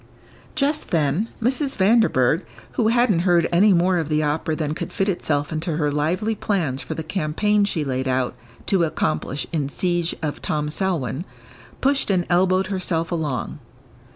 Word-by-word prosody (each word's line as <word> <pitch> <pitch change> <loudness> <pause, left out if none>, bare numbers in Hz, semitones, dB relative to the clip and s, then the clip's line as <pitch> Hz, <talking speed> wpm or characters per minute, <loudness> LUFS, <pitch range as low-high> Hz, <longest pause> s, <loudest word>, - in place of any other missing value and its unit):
Just 290 +2 0
then 165 +7 +1
Mrs. 265 +4 0
Vanderburgh, 190 - +3 0.3
who 220 - +1
hadn't 230 -5 +3
heard 175 -1 +3
any 195 +5 +5
more 180 0 +3
of 160 -2 -3
the 155 0 +1
opera 155 +1 -1
than 150 -1 -2
could - - -5
fit 195 - -1
itself 145 -6 -1
into 155 0 -2
her 150 -2 +1
lively 175 +10 0
plans 170 -11 -1
for 125 - -5
the 160 - -4
campaign 200 +6 +1
she 165 -6 -1
laid 130 0 -2
out 130 -1 0 0.3
to 190 -3 +2
accomplish 155 -3 -1
in 145 -4 -1
siege 175 +1 -1
of 150 -2 -3
Tom 150 -1 -2
Selwyn, 165 - -1 0.6
pushed 275 -2 +1
and 180 -3 +2
elbowed 185 +2 +3
herself 185 -4 -1
along. 150 -5 -2
170 Hz, 160 wpm, -22 LUFS, 150-195 Hz, 0.6 s, any